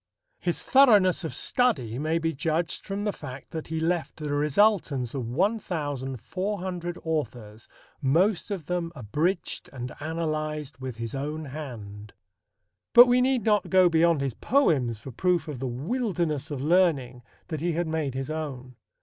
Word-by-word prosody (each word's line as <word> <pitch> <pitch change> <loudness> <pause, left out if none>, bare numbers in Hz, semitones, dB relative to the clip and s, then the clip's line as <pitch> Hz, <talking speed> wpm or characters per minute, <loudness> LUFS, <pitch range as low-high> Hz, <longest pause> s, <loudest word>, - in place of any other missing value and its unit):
His - - -1
thoroughness 210 -10 +5
of 160 - -4
study 130 - +1
may 155 +2 +1
be 165 0 -1
judged 160 +3 -2
from 200 0 -3
the 205 -1 0
fact 130 -2 -9
that 160 -1 -5
"he 160 0 -2
left 165 +1 -1
the 150 -2 -3
resultance 145 - +2
of 130 -5 -3
1,400 175 - -2
authors, 120 -9 -4 0.3
most 175 +11 +2
of 190 -7 -4
them 175 0 -2
abridged 150 - -2
and 125 -2 -6
analyzed 155 -2 -3
with 130 -2 -5
his 115 -1 -5
own 150 +3 -4
hand." 110 -8 -8 0.8
But 240 +1 +11
we 245 0 +3
need 255 -3 +2
not 210 -1 +2
go 185 -2 +6
beyond 165 -2 +3
his 135 -3 -1
poems 140 - +2
for 130 +5 -9
proof 175 +4 +1
of 145 -5 -5
the 130 - -2
wilderness 160 - -2
of 140 -3 -4
learning 150 -7 +2 0.3
that 155 -3 -3
he 175 0 0
had 175 +2 0
made 160 -4 -2
his 135 +2 -3
own. 130 -6 -5
155 Hz, 155 wpm, -27 LUFS, 135-180 Hz, 0.8 s, But